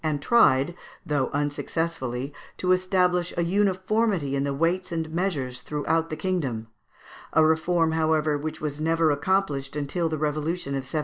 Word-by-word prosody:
and 155 -2 0
tried, 150 - +4 0.3
though 145 -3 0
unsuccessfully, 145 -2 -2 0.2
to 185 - 0
establish 180 -1 +2
a 170 - +2
uniformity 190 -3 +1
in 140 - 0
the 140 - -1
weights 175 +5 0
and 165 -1 -3
measures 145 -8 -2
throughout 160 +2 -1
the 155 - -3
kingdom; 145 -12 -2 0.7
a 160 - +5
reform, 160 +1 +2
however, 155 -1 +2
which 155 +2 -4
was 150 -1 -4
never 165 0 +3
accomplished 145 -3 0
until 150 +4 -1
the 155 - -2
revolution 155 +1 -2
of - - 0
1789. 135 +4 -3
160 Hz, 150 wpm, -25 LUFS, 145-180 Hz, 0.7 s, a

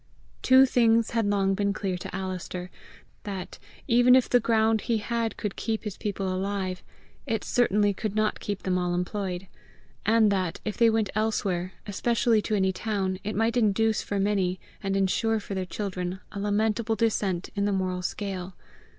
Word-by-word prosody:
Two 260 +1 +7
things 230 -3 +3
had 230 -3 +1
long 195 -1 +2
been 200 +1 0
clear 195 -3 -2
to 180 - -6
Alister 185 -1 -5 0.5
that, 195 -3 -6 0.3
even 245 0 +6
if 260 - +4
the 245 - +4
ground 220 -1 +2
he 230 -2 0
had 230 +1 -2
could 210 -3 -3
keep 220 -1 -2
his 210 -3 -5
people 200 -2 -3
alive, 190 -1 -2 0.5
it 225 -1 -1
certainly 210 -4 +2
could 210 +1 -4
not 215 0 +1
keep 205 -2 -4
them 180 -1 +1
all 175 0 0
employed; 180 0 -3 0.6
and 220 -1 +4
that, 185 -4 -1
if 215 - -2
they 230 -1 +5
went 220 -2 +1
elsewhere, 195 -4 -1
especially 225 +2 +1
to 215 - -1
any 190 -1 +2
town, 190 -2 -2
it 210 +1 -3
might 225 +2 +1
induce 220 -1 +2
for 200 - -3
many, 195 -2 +1 0.2
and 195 -1 -1
ensure 220 +3 +1
for 200 - -7
their 190 -1 -3
children, 185 -2 -4
a 200 - -6
lamentable 215 +2 0
descent 205 -5 0
in 200 0 0
the 205 - +1
moral 185 -2 -1
scale. 190 -1 -4
205 Hz, 175 wpm, -27 LUFS, 190-225 Hz, 0.6 s, Two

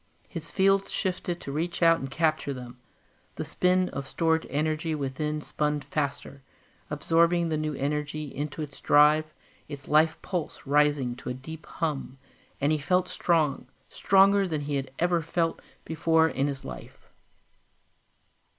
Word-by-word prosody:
His - - -7
fields 195 0 +2
shifted 180 -2 -2
to 140 - -6
reach 170 +4 -2
out 165 0 +6
and 135 - -5
capture 155 -2 0
them; 125 -1 -10 0.6
the - - -4
spin 185 0 +2
of 140 -1 -5
stored 160 +1 +1
energy 155 +3 -1
within 150 +2 -2
spun 150 0 -1
faster, 140 0 -4 0.5
absorbing 170 +3 +2
the 155 - 0
new 155 -1 -2
energy 150 +2 -2
into 150 +2 -4
its 145 - -10
drive, 150 +1 +5 0.4
its 140 -2 -9
life 155 +1 +3
pulse 175 -5 -4
rising 145 -3 +2
to - - -7
a 125 - -3
deep 160 +5 -10
hum, 150 -5 -3 0.4
and 145 +2 +2
he 155 - +1
felt 180 +4 +1
strong, 165 -5 +1 0.2
stronger 195 0 +4
than 155 -4 -2
he 145 0 -4
had 135 -1 -2
ever 175 0 +2
felt 165 +1 -1 0.2
before 160 0 +3
in 140 -3 0
his 140 -1 -5
life. - - -10
155 Hz, 150 wpm, -27 LUFS, 145-165 Hz, 0.6 s, out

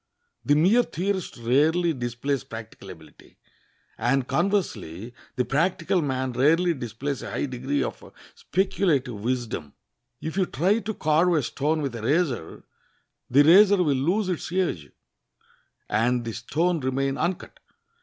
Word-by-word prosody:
The 145 - +3
mere 190 +11 +5
theorist 190 - -3
rarely 155 +9 +2
displays 125 +1 -3
practical 110 -3 -10
ability; 80 -3 -15 0.6
and, 130 +1 +1
conversely, 125 - -2 0.2
the 125 -2 0
practical 170 +5 +1
man 130 -3 -2
rarely 165 +8 +3
displays 130 +1 -5
a - - -6
high - - -2
degree 130 +2 -2
of - - -7 0.2
speculative 165 -7 0
wisdom. 110 - -3 0.5
If 160 +3 -5
you 190 -2 +2
try 190 - +1
to 220 -1 -5
carve 160 +3 +2
a 150 - +1
stone 150 +5 -1
with 135 -3 -3
a 115 - -6
razor, 135 - -1 0.7
the 140 +3 +6
razor 200 +6 +7
will 145 -4 +1
lose 180 +10 0
its 175 -3 -3
edge, 170 - -1 1.0
and 120 +3 +1
the 115 - -4
stone 160 +10 0
remain 135 0 -1
uncut. 175 +1 -3
140 Hz, 135 wpm, -25 LUFS, 120-175 Hz, 1.0 s, razor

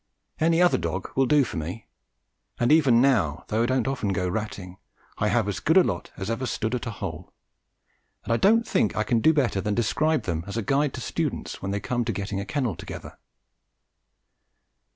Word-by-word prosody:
Any 165 +2 +3
other 175 - +4
dog 85 +2 -4
will 135 -1 +3
do 150 0 +5
for 110 - -5
me, 85 +7 -5 0.7
and 120 +3 +2
even 135 -6 +5
now, 95 - +2
though 110 +2 +1
I - - +3
don't 130 -1 +1
often 130 -7 -1
go 90 0 -1
ratting, 95 -2 -5 0.4
I 105 - +2
have 110 0 +1
as 100 - -2
good 160 +4 +3
a 185 - +8
lot 95 - -3
as 95 - -4
ever 130 +3 -2
stood 110 0 -2
at 125 -1 -2
a - - -1
hole, 110 - -6 0.9
and 115 - -1
I - - +3
don't 225 - +4
think 105 - +1
I 110 - +1
can 115 +1 +1
do 155 - +5
better 130 -10 +1
than 105 +2 -1
describe 155 +7 +1
them 85 -3 -2
as 100 - -5
a 115 - -1
guide 140 +6 +1
to - - -6
students - - -3
when 95 - -3
they 100 +1 -1
come 120 +3 -1
to 115 - 0
getting 100 -2 -3
a 100 - -4
kennel 130 - -1
together. - - -9
115 Hz, 210 wpm, -25 LUFS, 100-135 Hz, 0.9 s, a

